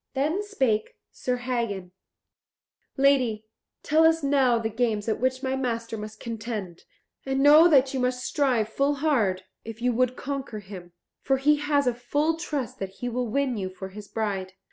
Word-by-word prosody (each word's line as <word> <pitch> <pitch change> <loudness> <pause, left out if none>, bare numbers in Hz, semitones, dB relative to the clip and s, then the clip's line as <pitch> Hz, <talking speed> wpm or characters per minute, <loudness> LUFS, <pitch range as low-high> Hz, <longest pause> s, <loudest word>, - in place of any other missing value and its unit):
Then 305 +8 0
spake 265 - -1 0.2
Sir 250 - -2
Hagen, 235 -7 -3 1.1
"Lady, 255 -6 +3 0.4
tell 310 +2 +3
us 325 -1 +4
now 270 -4 +3
the 225 -1 -1
games 220 -2 -1
at 220 - 0
which 260 +1 0
my 265 0 0
master 230 -3 -2
must 215 0 -8
contend; 220 -6 -6 0.4
and 270 0 -1
know 305 +4 +8
that 275 -5 +4
you 265 - -1
must 250 0 -1
strive 255 -7 +1
full 275 +6 0
hard, 235 -11 +1 0.2
if 225 0 -8
you 245 +1 +1
would 250 +1 +1
conquer 270 -5 -5
him, 190 -4 -10 0.3
for 270 0 +1
he 295 +3 +3
has 290 -1 +1
a 250 - +2
full 290 +7 0
trust 295 -8 -4
that 195 - -3
he 245 +6 -5
will 245 +1 -2
win 260 +1 0
you 190 -2 -3
for 190 +1 -8
his 205 +1 -10
bride." 195 -4 -3
250 Hz, 175 wpm, -26 LUFS, 215-275 Hz, 1.1 s, know